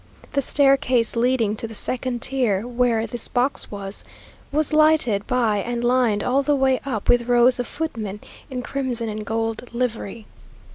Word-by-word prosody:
The 280 - +2
staircase 270 -4 +3
leading 230 -3 +1
to 230 - -3
the 225 - -8
second 250 +1 -1
tier 235 -6 0
where 240 -2 +1
this 235 +2 -4
box 255 +3 -1
was, 200 -1 -6 0.5
was 305 +1 0
lighted 305 -10 +3
by 230 -5 +1
and 240 +3 -3
lined 240 -4 +2
all 265 +3 +2
the 290 +1 +1
way 265 -1 +2
up 220 -7 -3
with 245 -1 +3
rows 245 +1 +4
of 245 - -2
footmen 225 -10 -4 0.3
in 250 -1 -4
crimson 250 -4 -2
and 215 0 -5
gold 225 +2 -3
livery. 230 -3 -3
245 Hz, 160 wpm, -22 LUFS, 225-260 Hz, 0.5 s, rows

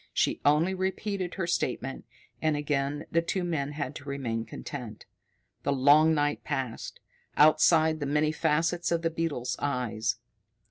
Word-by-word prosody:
She - - +1
only 150 +6 +3
repeated 190 0 -2
her 190 - -2
statement, 135 -5 -2 0.4
and 155 -2 +1
again 145 0 -1
the 165 - +3
two 180 +2 -2
men 150 -5 -2
had 145 -2 -4
to 140 0 -10
remain 115 -5 -3
content. - - -8 0.6
The - - 0
long 145 +4 +5
night 145 0 0
passed. 135 -6 -4 0.4
Outside 155 +1 +5
the 145 - -2
many 150 +2 +2
facets 165 +3 0
of 170 0 0
the 165 - +1
beetle 160 -7 -2
eyes. 115 -5 -1
150 Hz, 145 wpm, -28 LUFS, 140-165 Hz, 0.6 s, long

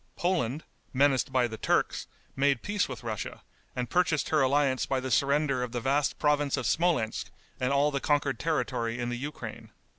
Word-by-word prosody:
Poland, 160 -6 0 0.3
menaced 135 -1 +3
by 130 -2 +3
the 110 -1 -8
Turks, - - 0 0.3
made 135 -2 +2
peace 205 -4 0
with 125 -2 -7
Russia, 110 -3 -5 0.3
and 125 -1 -2
purchased 165 -3 +1
her 155 -2 +3
alliance 135 -1 +2
by 135 - 0
the 130 0 -4
surrender 140 +1 +2
of 125 -1 -4
the 120 - -1
vast 135 +3 +1
province 145 -2 +2
of 130 - -3
Smolensk 155 -4 +1 0.3
and 125 +1 0
all 140 +1 +3
the 140 - -1
conquered 140 -3 +1
territory 125 -7 -1
in 120 0 -2
the 120 - -2
Ukraine. 145 +4 -7
135 Hz, 180 wpm, -29 LUFS, 125-150 Hz, 0.3 s, menaced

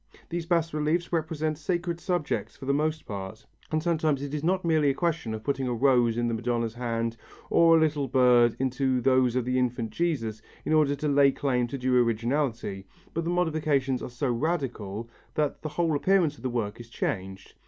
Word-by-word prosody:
These 170 -1 -4
bas 165 -2 +1
reliefs 155 +4 0
represent 155 -1 -1
sacred 170 +1 -2
subjects 175 -4 -2
for 135 - -9
the 140 - +1
most 155 +2 -1
part, 100 +1 -7 0.3
and 155 0 0
sometimes 155 -5 +1
it 145 0 -5
is 150 -1 -3
not 185 +2 +1
merely 155 -3 +3
a 135 - 0
question 165 -9 -1
of 110 - -8
putting 135 -1 -1
a 120 - -1
rose 120 -2 +3
in 120 0 +1
the 115 - -1
Madonna's 115 0 -1
hand 115 -1 -2 0.3
or 165 -1 +6
a - - +4
little 150 -3 +1
bird 125 -2 +4
into 130 0 0
those 130 -1 +3
of 125 -2 0
the 125 +1 +1
Infant 120 -3 -1
Jesus, 115 -11 -2 0.2
in - - 0
order 150 -2 +3
to 150 +2 -3
lay 140 -1 +5
claim 125 -3 0
to 135 - -5
due 125 -1 +3
originality, 115 -4 -1 0.3
but 165 0 -2
the - - -1
modifications 155 -7 +1
are - - -5
so 125 +2 -2
radical 120 - -2 0.3
that 150 -2 -1
the 155 - -4
whole 165 0 0
appearance 170 -1 +2
of - - -17
the 130 - -2
work 115 -3 -3
is 115 -1 -10
changed. 95 -3 -4
135 Hz, 200 wpm, -27 LUFS, 120-155 Hz, 0.3 s, or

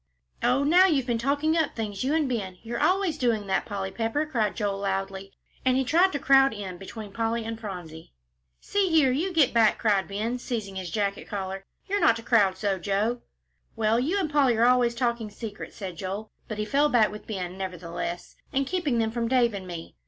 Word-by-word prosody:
"Oh, 250 +3 +2
now 355 +6 +6
you've 285 -8 +1
been 240 -2 0
talking 285 +6 +1
up 320 -3 0
things, 210 -2 -3
you 280 +4 +1
and 310 -3 +2
Ben; 200 -7 -3
you're 235 +1 -4
always 370 -5 +2
doing 230 -5 +1
that, 190 -1 -1
Polly 195 -2 -4
Pepper," 230 +8 -1
cried 225 -9 -1
Joel, 200 -2 -1
loudly. 195 0 -3 0.3
And 255 0 +3
he 265 - +2
tried 350 +8 +4
to - - 0
crowd 270 -3 +4
in 190 -4 -6
between 205 +1 -8
Polly 230 0 -1
and 225 0 -5
Phronsie. 175 -7 -8 0.5
"See 400 -2 0
here, 310 -6 +4
you 330 +9 0
get 315 -7 +3
back!" 225 -2 +4
cried 200 -5 +1
Ben, 220 +5 -2
seizing 220 -6 -4
his 185 -2 -4
jacket 200 +1 -2
collar; 195 -1 -5 0.2
"you're 405 +1 -1
not 230 - +5
to 230 - -7
crowd 205 -6 +3
so, 195 -1 -1
Joe." 210 +6 0 0.5
"Well, 225 0 +2
you 330 +11 0
and 365 - 0
Polly 280 -6 +3
are 230 - +4
always 245 -1 +3
talking 235 -3 -1
secrets," 210 0 -8
said 185 -5 -6
Joel, 195 +4 -5 0.2
but 215 - -5
he 210 - -1
fell 285 +7 +2
back 225 -5 +4
with 210 - -10
Ben 185 -4 -4
nevertheless, 175 -2 -5 0.2
"and 275 +1 +1
keeping 300 -6 -1
them 225 -1 +1
from 230 0 -1
Dave 240 -2 +3
and 190 -2 -6
me." 170 -2 -8
225 Hz, 210 wpm, -26 LUFS, 195-265 Hz, 0.5 s, now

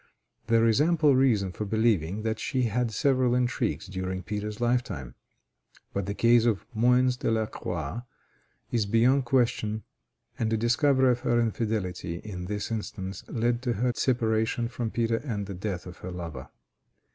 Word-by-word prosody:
There 115 0 +4
is 115 +4 +4
ample 155 -3 +4
reason 115 -8 +3
for 100 - -5
believing 105 -3 +1
that 110 -1 -1
she 130 -3 -1
had 120 +1 0
several 130 +1 +2
intrigues 125 -2 0
during 95 -1 -4
Peter's 105 +3 -4
lifetime, 120 - -1 0.8
but 100 -2 -2
the 100 - -3
case 115 0 +4
of 110 -5 +1
Moens 125 +2 +3
de - - -1
la 110 -1 +1
Croix 85 -1 -4 0.7
is 115 -4 +1
beyond 125 +5 +3
question, 115 -4 +1 0.6
and 110 -1 0
the 110 - +2
discovery 130 +3 +3
of 125 - 0
her 120 0 +1
infidelity 105 -6 -2
in 90 -1 -7
this 105 +3 -4
instance 100 -3 -5
led 120 +1 0
to 125 -2 0
her 125 +4 +1
separation 115 -2 +1
from 120 -1 -3
Peter 115 0 0
and 115 -6 -4
the 100 - -6
death 95 -1 -4
of 90 -1 -9
her 90 - -7
lover. 85 -7 -7
115 Hz, 160 wpm, -27 LUFS, 100-120 Hz, 0.8 s, There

